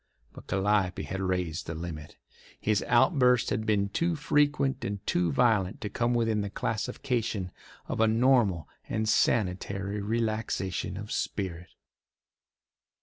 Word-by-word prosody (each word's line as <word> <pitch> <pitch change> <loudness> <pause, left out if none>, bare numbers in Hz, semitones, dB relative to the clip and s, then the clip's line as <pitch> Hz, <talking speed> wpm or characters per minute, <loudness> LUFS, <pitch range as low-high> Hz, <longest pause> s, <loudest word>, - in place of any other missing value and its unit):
But - - -13
Calliope 95 -1 +1
had 95 +1 -4
raised 90 -4 -2
the 85 - -4
limit. 80 -2 -7 0.4
His 105 -1 +1
outbursts 125 -1 +4
had 110 -1 -1
been 100 -2 +2
too 170 +10 0
frequent 145 -3 +1
and 100 -3 -4
too 85 -1 +1
violent 110 -6 +2
to 105 - -3
come 120 0 0
within 115 -3 +1
the 100 - -3
classification 115 -3 -2 0.4
of - - -3
a 110 - +5
normal 110 - +3 0.2
and 110 0 -1
sanitary 100 -1 0
relaxation 110 -4 -2
of - - -7
spirit. 90 -3 -3
105 Hz, 130 wpm, -28 LUFS, 95-120 Hz, 0.4 s, a